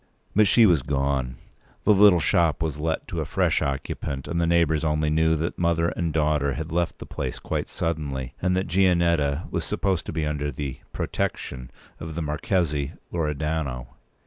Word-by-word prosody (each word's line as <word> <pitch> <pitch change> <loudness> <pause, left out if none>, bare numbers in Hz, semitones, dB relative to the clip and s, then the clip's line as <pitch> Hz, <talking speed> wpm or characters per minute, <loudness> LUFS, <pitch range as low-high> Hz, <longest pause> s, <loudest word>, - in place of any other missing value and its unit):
But 105 0 +5
she 115 +3 +6
was 85 -8 +4
gone. 70 -2 -1 0.5
The 105 - +5
little 100 -3 +7
shop 80 -1 +2
was 75 -2 -3
let 80 +1 -2
to - - -2
a - - -2
fresh - - +1
occupant; 70 0 -3
and 85 0 -1
the 85 - +2
neighbours 85 -2 +2
only 75 -1 +1
knew 80 +1 +3
that 80 +2 -3
mother 85 -1 +2
and 85 -2 -2
daughter 75 -2 +1
had 80 +2 -5
left 85 0 0
the - - -9
place - - -4
quite - - -3
suddenly, 70 -6 -3
and 90 0 +1
that 95 - 0
Gianetta 85 -5 +2
was - - -1
supposed 95 -3 -1
to - - -3
be 80 -1 -1
under 75 -1 -2
the 70 0 -5
"protection" 65 -1 -3 0.3
of 80 -1 -7
the 85 - -2
Marchese 75 -1 -1 0.2
Loredano. 75 -5 -2
80 Hz, 175 wpm, -25 LUFS, 70-85 Hz, 0.5 s, little